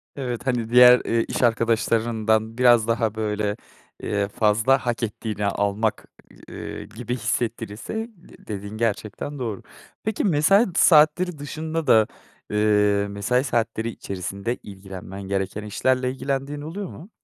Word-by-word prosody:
Evet, 125 -2 -4
hani, 120 -3 0
diğer, 125 +1 +8
eee, 115 0 +1
iş - - -3
arkadaşlarından 115 -1 +1
biraz 120 -3 +5
daha, 115 -2 0
böyle, 105 -1 -1 0.5
eee, 100 -1 0
fazla 110 +5 +3
hak 120 0 -1
ettiğini 105 -1 -3
almak, 100 +2 0 0.4
ııı, - - -7
gibi 120 +1 -6
hissettirirse 110 -1 -3 0.2
de 170 - -19
dediğin 100 +1 -6
gerçekten 115 +5 -3
doğru. 115 -6 -4 0.4
Peki, 220 -1 -1
mesai 195 +5 +4
saatleri 155 +2 +5
dışında 155 +2 -4
da, 110 -1 +5 0.4
eee, 105 -1 +2
mesai 105 +6 0
saatleri 115 -3 -1
içerisinde 100 +2 -4
ilgilenmen 95 0 -9
gereken 95 +1 -3
işlerle 130 +4 0
ilgilendiğin 140 +2 -3
oluyor 180 +6 -5
mu? 175 +8 -11
115 Hz, 125 wpm, -23 LUFS, 105-130 Hz, 0.5 s, diğer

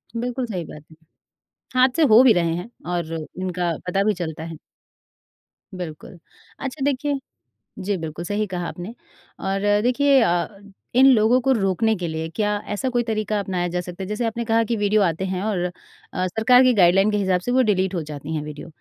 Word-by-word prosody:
बिल्कुल 245 +2 -2
सही 190 -7 -4
बात 150 -1 -11
है। - - -15 0.8
हादसे 255 +5 +3
हो 235 +4 +9
भी 250 - +7
रहे 170 -4 +1
हैं 180 +7 -6 0.2
और 170 -2 -2
इनका 175 +2 -3
पता 195 +2 +1
भी 215 - +2
चलता 160 -3 -5
है। 165 -1 -7 1.2
बिल्कुल, 175 0 -8 0.4
अच्छा 270 +1 -4
देखिए 285 0 0 0.7
जी 200 0 0
बिल्कुल 160 +1 -6
सही 205 +3 -1
कहा 175 -2 -4
आपने 180 +6 -7 0.5
और 195 0 -2 0.2
देखिए 270 +3 +4
अ, 175 -6 +2 0.5
इन 260 +2 +7
लोगों 225 +2 +4
को 265 +2 +2
रोकने 220 +1 +1
के 180 -3 -4
लिए 160 0 -3
क्या 210 -1 +1 0.2
ऐसा 260 +6 -1
कोई 240 -1 0
तरीका 215 -2 -1
अपनाया 185 -3 -2
जा 175 +1 -2
सकता 180 +1 -7
है? - - -6
जैसे 210 +3 -2
आपने 230 +1 -2
कहा 225 0 +2
की 230 +1 -1
वीडियो 205 0 +2
आते 180 0 0
हैं 185 0 -3
और 210 -4 -1 0.5
अ, 185 0 -1
सरकार 225 +6 +4
की 255 -1 +5
गाइडलाइन 195 +1 +4
के 210 - +1
हिसाब 190 -3 +1
से 245 - -3
वो 255 +1 +4
डिलीट 190 -4 +1
हो 170 - -1
जाती 150 +1 -7
हैं 155 - -2
वीडियो। 150 +1 -8
195 Hz, 195 wpm, -22 LUFS, 175-230 Hz, 1.2 s, हो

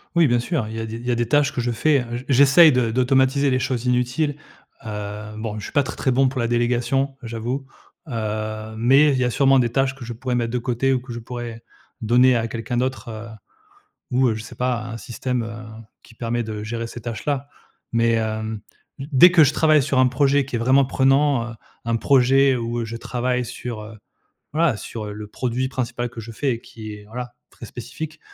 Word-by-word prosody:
Oui, 170 -2 +5
bien 120 -1 +2
sûr, 125 -2 -2
il 110 - -7
y - - -3
a 110 - -3
des 110 0 -6
il 115 +1 -8
y 125 - 0
a - - +2
des 120 0 -1
tâches 145 +2 +3
que - - -3
je 120 0 0
fais, 140 +5 +2
heu, 120 0 -5
j 125 - -7
j'essaye 140 +5 +7
de 125 -3 +1
d'automatiser 130 +3 +2
les 130 - +2
choses 125 -2 -2
inutiles, 125 +4 0 0.5
heu, 105 0 -6
bon, 110 -1 -4
je - - -8
suis - - -9
pas 145 -1 +3
très, 130 - -7
très 130 - +1
bon 130 +1 +3
pour 130 0 -5
la 115 - +1
délégation, 120 +3 0
j'avoue, 120 +4 -4 0.4
heu, 110 -2 -4
mais 135 +6 +5
il 135 - +1
y 125 - +2
a - - +1
sûrement 135 +2 +4
des 120 -2 +2
tâches 135 +1 +1
que 135 -3 -10
je 120 - -5
pourrais 125 +2 -3
mettre 120 -1 -1
de - - +1
côté 125 +2 0
ou 130 - 0
que 125 0 -10
je 120 - -5
pourrais 120 -1 -7 0.4
donner 125 +3 +4
à 115 0 -1
quelqu'un 115 +1 -4
d'autre, 130 0 -2
heu, 110 0 -7 0.8
ou, 130 0 +3
heu, 110 - +1
je 110 - -6
sais 110 - -11
pas, 125 -3 -1
un 115 -1 -6
système, 120 +3 -3
heu, 110 0 -8 0.2
qui 115 - -18
permet 120 +1 -2
de 110 -2 -5
gérer 115 +1 -4
ces 120 0 -9
tâches-là. 130 +5 -3 0.4
Mais, 115 0 +3
hem, 110 -1 -2 0.4
d 135 - -6
dès 160 +7 +8
que 170 -3 +6
je 140 - +2
travaille 155 -2 +4
sur 135 0 0
un 130 - +6
projet 140 +1 +2
qui 130 -3 -3
est - - 0
vraiment 130 +3 +4
prenant, 135 -2 +2
heu, - - -11 0.3
un 115 0 0
projet 135 +1 +4
où, 120 0 -3
heu, - - -2
je 115 +1 -6
travaille 125 +1 -2
sur, 115 -1 -6
heu, 110 +1 -11 0.6
voilà, 155 -7 +2
sur, 110 0 -6
heu, 105 - -6
le 105 0 -7
produit 125 +4 -2
principal 120 -2 -3
que 115 - -8
je 115 +1 -9
fais 135 +5 -1
et 115 - -7
qui 110 -2 -9
est, 105 0 -11
voilà, 120 +2 -7 0.2
très - - -11
spécifique, 155 0 -7
120 Hz, 235 wpm, -22 LUFS, 115-135 Hz, 0.8 s, dès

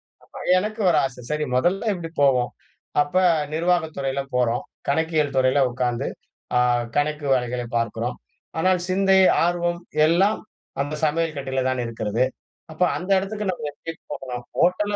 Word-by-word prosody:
ஏற்படுத்திக்கனும். - - -24
ஆமா - - -6 0.2
எனக்கு 215 +3 -4
ஒரு 160 - +3
ஆசை. 125 -2 -4
சரி 150 0 0
மொதல்ல 190 - +1
இப்டி 170 -3 -6
போவோம். 125 -3 +3 0.5
அப்ப 145 +4 -3 0.4
நிர்வாக 170 0 +1
துறையில 135 0 -1
போறோம். 120 -1 +1 0.3
கணக்கியல் 155 -1 +1
துறையில 130 +2 +4
உக்காந்து 120 -1 -1 0.5
அ - - +5 0.4
கணக்கு 150 0 0
வேலைகளை 125 -1 -1
பார்க்கிறோம். 115 +2 -2 0.4
ஆனால் 185 +1 +3
சிந்தை, 190 +1 +4 0.3
ஆர்வம் 175 0 0 0.3
எல்லாம் 190 +6 +3 0.4
அந்த 145 +2 -4
சமையல் 160 +1 0
கட்டில 135 -1 -2
தான் 130 -1 -1
இருக்கிறது. 115 +1 0 0.5
அப்ப 155 - -13 0.2
அந்த 180 +2 -7
எடத்துக்கு 205 +1 -3
நம்ம 155 -4 -5
எப்டி 165 - -7 0.2
போகலாம்? 125 -2 -6
ஹோட்டல் 205 +4 +2
150 Hz, 145 wpm, -23 LUFS, 125-175 Hz, 0.5 s, அ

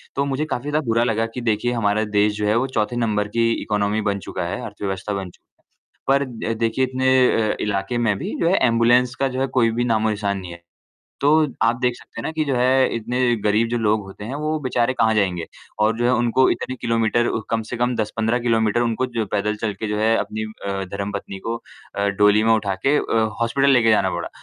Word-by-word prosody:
तो 140 - +1
मुझे 140 +2 -1
काफ़ी 140 -2 -4
ज़्यादा 150 0 0
बुरा 115 +1 +2
लगा 115 -1 0
कि 125 - -3
देखिए 115 +1 0
हमारा 110 -2 +1
देश 105 0 +3
जो 105 - -1
है 105 - +2
वो 130 - +1
चौथे 110 +2 0
नंबर 105 -3 0
की 115 0 +3
इकॉनमी 105 +1 0
बन 100 -1 -1
चुका 90 - -3
है, 90 - -4
अर्थव्यवस्था 100 -1 -4
बन 95 -2 -4
चुका - - -26 0.5
है। 140 - +4
पर - - 0 0.3
अ, - - +1
देखिए 115 +3 0
इतने 130 0 -1 0.4
अ, - - -2
इलाके 100 +3 -1
में 110 -4 +1
भी - - -4
जो 165 - +2
है 190 - +3
एम्बुलेंस 120 +2 +3
का 135 - 0
जो 130 0 -3
है, 135 - +1
कोई 115 -4 +2
भी 120 +2 -1
नामो 110 -2 +1
निशान 100 -2 -1
नहीं 90 -2 -8
है। 85 - -11 0.6
तो 140 - +2 0.3
आप 115 +1 +3
देख 125 -1 +2
सकते 115 - -10
हैं - - -8
ना - - -2
कि 155 -1 -1
जो 140 - -1
है 130 +2 +3
इतने 120 +2 -3 0.3
गरीब 110 +2 +2
जो 120 - -1
लोग 110 -1 +2
होते 95 +1 -10
हैं, 120 +5 -5
वो 155 +2 -2
बेचारे 130 -2 0
कहाँ 110 -2 +2
जाएँगे 90 -5 0 0.3
और 110 +1 +2
जो 120 - 0
है 120 - +4
उनको 120 +2 +3
इतने 130 +2 -2
किलोमीटर 115 0 +1 0.2
कम 115 0 0
से 125 - -3
कम 120 +1 0
10-15 110 +2 0
किलोमीटर 115 -1 +1
उनको 120 +2 0
जो 115 -2 0
पैदल 105 +1 0
चलकर 110 -1 -2
जो 105 0 -2
है 110 +1 +3
अपनी 110 0 -3
अ, 100 -3 -5
धर्मपत्नी 100 -1 -5
को 115 +1 -1 0.4
अ, 100 - 0
डोली 105 +1 +5
में 115 - +4
उठा 100 -3 0
के 145 +2 +4
अ, 115 -1 +1 0.2
हॉस्पिटल 135 +4 +2
लेकर 120 -4 +4
जाना 100 -3 +3
पड़ा। 85 - -4
115 Hz, 230 wpm, -21 LUFS, 105-125 Hz, 0.6 s, डोली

